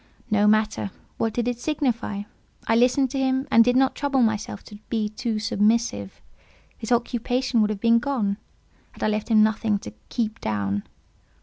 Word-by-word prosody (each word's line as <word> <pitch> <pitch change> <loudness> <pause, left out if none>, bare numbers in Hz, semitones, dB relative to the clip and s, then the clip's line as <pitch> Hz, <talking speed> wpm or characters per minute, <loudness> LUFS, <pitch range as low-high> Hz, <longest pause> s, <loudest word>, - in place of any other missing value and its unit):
No 210 0 +4
matter; 215 -1 +2 0.3
what 225 - 0
did 240 +2 -2
it 245 -1 -2
signify? 245 -8 -1 0.4
I 225 - +2
listened 250 +2 +3
to 275 - -2
him, 265 +1 0
and 230 - +7
did 245 +1 +2
not 265 0 +3
trouble 275 -3 +1
myself 215 -2 -1
to 205 - -12
be 220 -3 -1
too 225 0 -3
submissive; 210 - 0 0.6
his 225 +1 -7
occupation 245 +1 +1
would 210 - +2
have 210 -2 -3
been 230 0 +5
gone 230 -7 -1 0.6
had - - -8
I - - +3
left 215 +1 -2
him 215 -2 +6
nothing 215 -1 +1
to 105 - -9 0.2
"keep 225 -2 -2
down." 100 -2 -1
225 Hz, 175 wpm, -24 LUFS, 210-245 Hz, 0.6 s, and